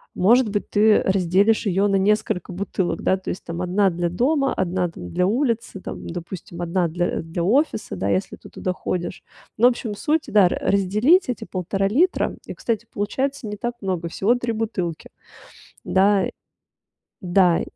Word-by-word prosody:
Может 230 +5 +4
быть, 205 0 -3
ты 215 +1 +4
разделишь 195 +4 +2
ее 195 +1 +2
на 200 - +1
несколько 195 -2 +1
бутылок, 185 0 -2
да, 190 - +2
то 190 - -7
есть - - -5
там 170 +1 -5
1 190 +2 +2
для 175 0 -2
дома, 270 - +1
1, 180 -1 -1
там, 90 - -9
для 180 - +1
улицы, 230 -1 -1
там, - - -8
допустим, 175 0 -7
1 175 +1 0
для 175 +2 -1
для 165 +1 -4
офиса, 230 - +1
да, 95 +2 -2
если 95 -1 -1
ты - - -15
туда 185 - -3
ходишь. 180 -1 -4 0.3
Ну 240 - +6
общем, 235 -3 -1
суть, 305 +8 0
да, 200 -3 +5
р - - -2
разделить 210 - +3
эти 245 - -3
1,5 195 +2 -1
литра. 320 - +1
И, - - -6
кстати, 230 -3 -2
получается 260 +5 -2
не 210 - -4
так 240 +4 -4
много- 185 -4 -2
всего 210 +8 +1
3 245 -1 -2
бутылки. 210 -7 -3 0.7
Да 195 0 +3 0.9
да 180 -1 +3
195 Hz, 170 wpm, -22 LUFS, 180-225 Hz, 0.9 s, Ну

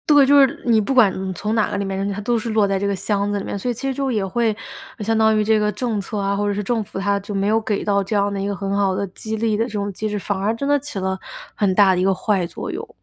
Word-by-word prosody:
对， 285 -1 +7
就 285 +1 +6
是 270 - +2
你 230 -3 +4
不 210 - -3
管 215 -7 +6 0.2
你 - - -2
从 210 +5 -3
哪 220 -1 +2
个 205 - -2
里 200 - -2
面 195 - -3
扔 195 +1 -2
进 205 - -1
去， - - -4
它 - - -3
都 240 +1 +1
是 225 +1 -4
落 215 -2 +3
在 195 -1 0
这 200 - -1
个 200 - 0
箱 200 +1 -1
子 205 - 0
里 195 - -4
面。 - - -4
所 250 - -2
以 245 - +1
其 270 +4 -4
实 270 - 0
最 275 - -3
后 265 - 0
也 210 -4 0
会 225 +4 +1 0.5
呃， 215 - -5
相 225 +1 +1
当 220 -1 +4
于 215 - +2
这 220 0 +3
个 210 0 +1
政 215 0 -2
策 210 +2 -6
啊， 200 0 0
或 205 +1 0
者 205 - +1
是 210 +1 -2
政 225 +2 0
府 195 - -9
它 200 +1 +1
就 200 +2 -9
没 195 - 0
有 220 +2 +2
给 210 -2 -2
到 200 -1 +1
这 195 +3 -3
样 200 0 +1
的 195 - -3
一 200 - -2
个 200 - -2
很 195 0 -3
好 195 -2 +1
的 200 +1 -1
激 220 +4 -5
励 220 -1 +1
的 225 +2 +1
这 - - -7
种 205 -1 -2
机 215 +3 -3
制， 210 - -2
反 205 0 -2
而 205 +3 0
真 280 +4 -3
的 290 0 +3
起 285 -6 -8
了 190 0 -1 0.4
很 195 -3 +1
大 195 -2 +6
的 180 - 0
一 - - +1
个 195 0 +3
坏 195 -2 0
作 165 - -6
用。 - - -6
205 Hz, 380 characters per minute, -21 LUFS, 195-220 Hz, 0.5 s, 对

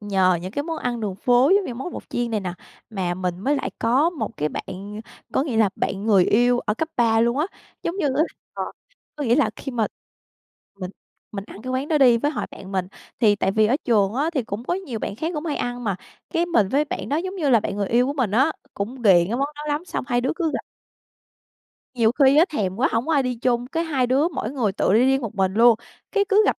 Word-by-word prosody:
nhờ 190 -4 +2
những 185 - -5
cái 285 +8 -2
món 325 -1 -3
ăn 240 -1 -2
đường 205 -4 -2
phố 245 +6 +4
giống 405 - +1
như 245 - -5
món 270 +8 -5
bột - - -9
chiên 240 -1 -1
này 215 -2 0
nè, 185 -2 -4 0.4
mà 185 -4 -2
mình 180 -1 -3
mới 280 +8 +1
lại - - -3
có 270 +9 +3
một 285 -9 -5
cái 150 - 0
bạn 200 +5 -7 0.3
có - - +2
nghĩa 270 -6 -2
là 220 -2 +4
bạn 200 +2 -2
người 195 -5 +5
yêu 245 +2 +3
ở 210 - -1
cấp 320 +6 -2
3 225 -2 +3
luôn 235 +3 +2
á. 310 - +2 0.4
Giống 340 +3 -2
như 345 - 0
á, 310 - +4 0.3
ờ - - -2 0.5
có 295 - -3
nghĩa 235 0 +3
là 295 - +3
khi 270 - -6
mà 225 -3 +1 0.9
mình 185 -1 -4 0.4
mình 195 -1 -5
ăn 210 - -11
cái 255 - -5
quán 265 +3 -2
đó 310 -2 +2
đi, 245 -4 +6
với 290 +5 0
hội - - -3
bạn 195 +1 -10
mình, 185 -1 -1 0.3
thì 210 -3 +5
tại 195 - +1
vì 215 +1 +4
ở 245 +5 +2
trường 210 -5 +2
á, 290 +6 +1
thì 270 - +1
cũng 215 +3 -5
có 350 - 0
nhiều 275 - -5
bạn 200 - -4
khác 325 +8 -2
cũng 305 +2 -3
hay 300 - -1
ăn 245 0 -3
mà, 200 -3 0 0.3
cái, 340 -1 +1
mình 225 - +2
với 285 +7 +2
bạn - - -5
đó 285 - +1
giống 375 +4 -3
như 300 -6 +1
là 230 -4 +5
bạn 200 - -4
người 200 -2 -1
yêu 245 +2 +3
của 280 - -1
mình 255 -8 0
á, 265 +9 +3 0.2
cũng 205 +5 -3
ghiền 180 -5 +6
cái 235 - -1
món 280 +2 0
đó 295 - -7
lắm 295 +4 -1
xong - - -4
hai 245 -1 +2
đứa 260 - 0
cứ 335 -4 0
gặp. - - -3 1.3
Nhiều 230 -2 +3
khi 275 +1 +5
á, 320 - +7
thèm 195 - -2
quá, 260 +4 +2
hổng 230 +2 0
có 325 - +1
ai 280 -3 +4
đi 250 -1 -1
chung, 240 0 0
cái 330 +5 -2
hai 270 -6 +1
đứa 270 +6 +3
mỗi 270 -9 -4
người 240 -8 0
tự 190 - +1
đi 215 - +5
riêng 270 +1 +3
một 225 -1 -5
mình 190 -1 +1
luôn. 235 +1 +7 0.4
Cái, 405 -1 +3
cứ 415 +2 +5
gặp - - +2
245 Hz, 265 wpm, -23 LUFS, 210-290 Hz, 1.3 s, á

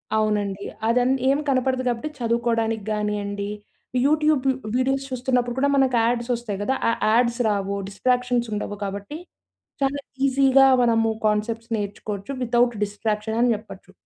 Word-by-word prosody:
అవునండి. 205 -2 0 0.2
అది 235 +2 +3
అన్ 255 +2 +2 0.2
ఏమి 280 +2 +2
కనపడదు 260 0 +1
కాబట్టి 245 +5 -1
చదువుకోవడానికి 230 -2 0
గానియండి. 205 -1 -2 0.6
యూట్యూబ్ 300 -2 +2 0.3
వీడియోస్ 270 +2 +1
చూస్తున్నప్పుడు 250 -1 0
కూడా 280 +1 +2
మనకు 265 -2 +3
యాడ్స్ 235 +1 0
వస్తాయి 215 -4 -5
గదా! 265 +5 0
ఆ - - +3 0.2
యాడ్స్ 235 +1 +2
రావు. 200 -1 -1
డిస్ట్రాక్షన్స్ 245 +2 0
ఉండవు 205 0 -4
కాబట్టి 200 +8 -5 0.6
చాలా 275 +1 +1 0.3
ఈజీగా 270 0 +5 0.2
మనము 225 -1 +3 0.2
కాన్సెప్ట్స్ 225 +2 -1
నేర్చుకోవచ్చు. 205 +2 -5
వితౌట్ 240 0 +2
డిస్ట్రాక్షన్ 210 +2 -2
అని 240 0 +4
జెప్పొచ్చు. 205 -3 -9
235 Hz, 130 wpm, -23 LUFS, 210-255 Hz, 0.6 s, ఈజీగా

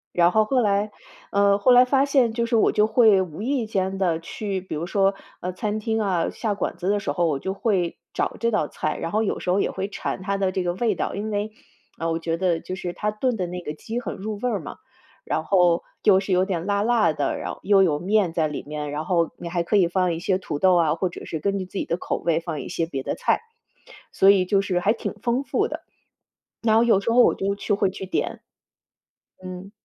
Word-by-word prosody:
然 175 0 +5
后 215 0 +3
后 255 +3 +2
来 205 -1 +1 0.4
呃， 200 0 +4
后 225 +5 +4
来 245 0 +8
发 270 +2 +2
现 270 -5 +3
就 235 0 0
是 235 - 0
我 220 - +4
就 210 0 +3
会 220 -4 +5
无 180 0 -6
意 255 0 0
间 195 -2 -1
地 180 -4 +1
去 195 +3 -4
比 185 - -8
如 155 +2 -3
说， 195 +1 +2 0.3
呃， 180 - -3
餐 210 +3 -3
厅 220 0 -1
啊， 185 -5 0
下 220 -3 -2
馆 200 - -3
子 185 - -2
的 205 0 +1
时 170 - -2
候 170 +4 +1
我 150 -3 0
就 190 +8 -3
会 195 -4 0 0.2
找 - - -2
这 230 - +1
道 205 -10 0
菜， 155 - -3
然 165 - -4
后 215 +1 +1
有 205 - -2
时 - - -3
候 185 +2 +3
也 - - +1
会 195 +1 -4
馋 200 - -4
它 200 +1 -1
的 190 -1 0
这 185 - -1
个 175 - 0
味 220 0 0
道。 - - -3
因 210 +2 -3
为， 205 +1 -2 0.5
呃， 165 +1 -1
我 - - 0
觉 165 0 -2
得 175 -2 0
就 185 - -5
是 175 -2 -4
他 210 +3 -2
炖 240 +4 -1
的 185 -4 -2
那 180 +1 -5
个 150 - -5
鸡 225 +9 -5
很 245 - -5
入 210 +2 -5
味 250 - 0
儿 210 -4 -1
嘛， 145 - -8 0.5
然 155 - -1
后 175 0 +3 0.2
又 190 -2 +5
是 195 - -5
有 185 +1 +3
点 180 -3 -3
辣 200 0 +1
辣 230 -5 +3
的， 145 - -1
然 - - -4
后 - - -10
又 195 -1 +5
有 150 -5 +1
面 195 0 +2
在 160 -2 +1
里 150 - -5
面， 150 -1 -5
然 150 +1 -3
后 170 0 +1
你 170 - -6
还 175 0 -1
可 210 - 0
以 185 -4 +4
放 180 -1 +1
一 165 - -4
些 185 +1 +1
土 160 -6 -5
豆 185 +1 +5
啊， 160 -2 +2
或 180 +2 -1
者 - - -9
是 160 - -4
根 200 +3 0
据 185 - -4
自 185 - -9
己 - - 0
的 170 - -2
口 - - -3
味 165 -1 +1
放 165 -3 -5
一 - - -8
些 170 -1 -1
别 135 -5 -5
的 - - -2
菜。 - - +1 0.7
所 195 - +5
以 190 -2 +5
就 195 +1 +2
是 180 -2 0
还 205 +4 +2
挺 230 - -5
丰 245 +3 0
富 - - 0
的。 - - -7 0.8
那 225 0 +4
有 225 -5 +4
时 215 - -1
候 245 +1 +6
我 - - +4
就 200 +1 -1
去 205 - -2
会 200 -1 +2
去 190 +1 -6
点。 185 - -3 1.0
嗯。 185 +1 -8
195 Hz, 275 characters per minute, -24 LUFS, 175-215 Hz, 1.0 s, 来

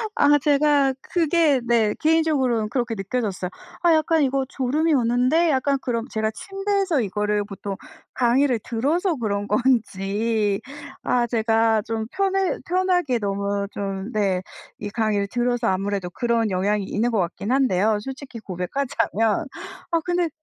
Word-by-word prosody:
아 290 0 +5
제가 285 -1 +3
그게 325 -5 +2
네 225 -3 +2
개인적으로는 285 -9 +2
그렇게 240 -2 -1
느껴졌어요. 195 -2 -3 0.3
'아. 340 -2 +5
약간 315 0 +3
이거 270 0 +1
졸음이 295 +5 0
오는데, 255 +7 +3
약간.' 275 0 +1
그럼 240 -2 -2
제가 220 0 -1
침대에서 390 - -1
이거를 210 0 -1
보통 200 -1 -6 0.4
강의를 245 0 +2
들어서 315 - 0
그런 205 -5 -2
건지. 210 -3 0 0.4
아. 240 -1 +1
제가 225 -1 +2
좀 225 -1 -3
편해 390 -1 +1
편하게 355 -8 +1
너무 200 0 -2
좀 195 +2 -4
네 195 -4 +1 0.4
이 205 - -4
강의를 210 -2 0
들어서 245 +1 0
아무래도 195 -1 -1
그런 230 +1 0
영향이 200 +2 0
있는 235 +5 0
것 220 - +1
같긴 185 +5 -2
한데요, 220 -6 +2
솔직히 265 0 -8
고백하자면. 225 - -1 0.5
아. 335 - +4
근데 350 -1 +1
235 Hz, 305 characters per minute, -23 LUFS, 210-285 Hz, 0.5 s, 아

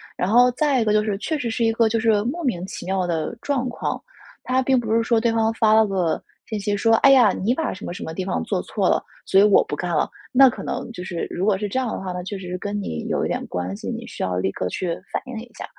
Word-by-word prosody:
然 180 - -1
后 245 +3 +6
再 275 +1 +1
一 - - +2
个 210 - +2
就 215 0 +3
是， 210 -2 -1
确 310 +9 -2
实 240 - -2
是 230 +1 0
一 225 - +3
个 225 0 +2
就 225 +1 +1
是 220 -2 +3
莫 330 +8 -3
名 225 - -1
其 - - -7
妙 190 -1 0
的 165 +5 -2
状 270 -3 -1
况。 - - -3 0.4
它 255 +1 +1
并 260 0 +3
不 220 -2 -2
是 230 - +4
说 230 0 +2
对 230 0 +1
方 225 0 +2
发 220 -1 +3
了 220 0 +6
个 185 -5 0 0.2
信 215 - -4
息 205 0 -1
说： 225 +2 +3
“哎 275 - +7
呀！ 245 -6 +6
你 215 +6 0
把 320 +4 -2
什 190 - -11
么 - - -5
什 - - -7
么 160 - -5
地 185 - -3
方 135 - -1
做 - - -1
错 - - -1
了， - - +2 0.2
所 195 - +4
以 - - +7
我 210 -1 +5
不 - - -4
干 175 +3 -3
了。” 150 - +2 0.2
那 265 +1 +7
可 250 - -7
能 - - -4
就 180 -6 -7
是 175 -2 -4
如 185 - -2
果 205 -2 +3
是 210 +2 -3
这 230 +6 -1
样 255 - -1
的 - - -4
话， 190 -1 -5
那 180 0 -4
确 200 +2 -5
实 185 - -8
是 180 +1 -3
跟 205 +2 -3
你 80 - -4
有 - - 0
一 - - 0
点 - - -2
关 90 +2 -3
系， - - -6
你 - - -5
需 - - -8
要 90 -1 -1
立 95 +1 0
刻 90 - -3
去 185 - -3 0.2
反 - - -1
映 250 -3 -5
一 240 +1 -11
下。 - - -5
215 Hz, 325 characters per minute, -22 LUFS, 185-240 Hz, 0.4 s, 哎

